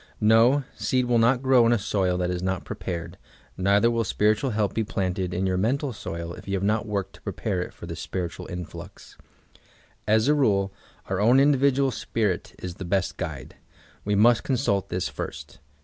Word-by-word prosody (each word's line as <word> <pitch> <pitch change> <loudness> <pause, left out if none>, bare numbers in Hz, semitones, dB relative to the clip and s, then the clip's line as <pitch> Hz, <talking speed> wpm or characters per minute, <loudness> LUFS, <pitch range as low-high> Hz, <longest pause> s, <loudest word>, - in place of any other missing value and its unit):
No, 115 +6 +5
seed 130 -1 0
will 120 -1 +2
not 120 +3 +3
grow 130 -2 +5
in - - +3
a 120 - +4
soil 95 -3 0
that 90 0 -1
is 90 -1 -3
not 95 -1 -2
prepared, 85 -2 -5 0.4
neither 100 +5 +3
will 115 -1 +1
spiritual 110 +5 +1
help 105 -4 0
be 115 - 0
planted 95 -3 -2
in 90 +2 -1
your 95 -1 0
mental 130 +7 0
soil 85 -4 -6
if - - -12
you 100 - -1
have 95 - -2
not 110 +2 +1
worked 100 -2 -3
to - - -17
ppepare - - -2
it - - -9
for - - -11
this - - -7
spiritual 90 -2 -5
influx. 90 -2 -9 0.9
As 110 +2 +3
a 150 - +5
rule, 100 -9 +2 0.3
our 95 0 -2
own 120 +5 +5
individual 140 -1 +3
spirit 105 -7 -2
is 90 -1 -6
the - - -1
best 95 +1 -1
guide. 75 -7 -6 0.5
We 105 0 0
must 115 +3 +5
consult 125 -7 0
this 90 - -1
first. - - -7
105 Hz, 190 wpm, -25 LUFS, 95-120 Hz, 0.9 s, No